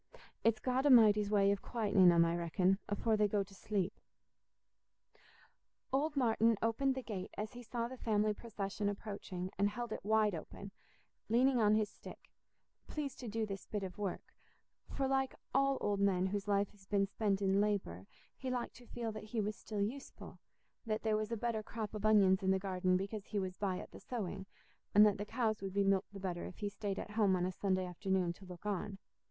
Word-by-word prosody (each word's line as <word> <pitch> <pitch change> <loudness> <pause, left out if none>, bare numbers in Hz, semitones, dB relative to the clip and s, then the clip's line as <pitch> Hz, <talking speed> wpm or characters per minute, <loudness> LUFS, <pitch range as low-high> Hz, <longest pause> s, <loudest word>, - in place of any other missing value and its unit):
It's 225 -1 +3
God 260 +4 +1
A'mighty's 215 -5 +6
way 200 -1 +4
o' - - +3
quietening 200 -5 +4
'em, 170 -1 +5
I 165 0 +1
reckon, 180 +3 +1
afore 220 +2 +1
they 210 -1 +3
go 205 0 +1
to 195 - -16
sleep." 195 -1 -2 2.0
Old 295 +3 +1
Martin 230 -3 +3
opened 260 +4 +1
the 260 - -4
gate 195 -5 -5
as 215 +3 -4
he 245 - -8
saw 235 0 -3
the 255 0 -9
family 215 -1 +2
procession 205 -2 -3
approaching, 200 -3 -5
and 200 +1 +4
held 240 +2 -5
it - - -4
wide 215 0 +3
open, 195 +4 -7 0.6
leaning 250 +3 +4
on 210 0 +5
his 215 -1 +2
stick—pleased 280 +6 -10
to 245 - -6
do 220 +1 -1
this 195 -2 -7
bit 210 -2 -3
of 190 +2 -6
work; 200 -3 -4 0.6
for, 270 - -1
like 265 0 0 0.2
all 275 0 +3
old 205 -1 0
men 190 -2 +3
whose 200 +1 -2
life 200 -1 +1
has 195 -2 -21
been 200 -1 +2
spent 200 0 0
in 195 0 +2
labour, 190 - -1 0.3
he 260 - -5
liked 250 -1 -2
to 245 0 -15
feel 230 -2 -4
that 215 0 -7
he 220 +1 -3
was 210 0 -1
still 205 -1 -3
useful—that 225 -2 -7
there 220 -1 +2
was 215 +1 -2
a 230 - -1
better 230 0 -1
crop 215 -1 -5
of 210 0 0
onions 195 -3 +5
in 190 - 0
the 190 - +4
garden 185 -1 +1
because 200 +2 -4
he 210 - -3
was 185 -2 -2
by 190 -2 -1
at - - -8
the - - -11
sowing—and 200 -1 0
that 205 -1 +2
the 205 - -2
cows 220 -2 -1
would 195 -1 -4
be 200 - +3
milked 195 0 +1
the 200 - -9
better 180 -2 -3
if - - -10
he 205 -2 -2
stayed 200 -1 -4
at - - -5
home 210 -3 +3
on 180 -1 0
a 185 - -1
Sunday 185 -1 0
afternoon 180 0 -1
to 190 - -15
look 180 +2 -11
on. 205 0 -2
205 Hz, 205 wpm, -35 LUFS, 195-225 Hz, 2.0 s, A'mighty's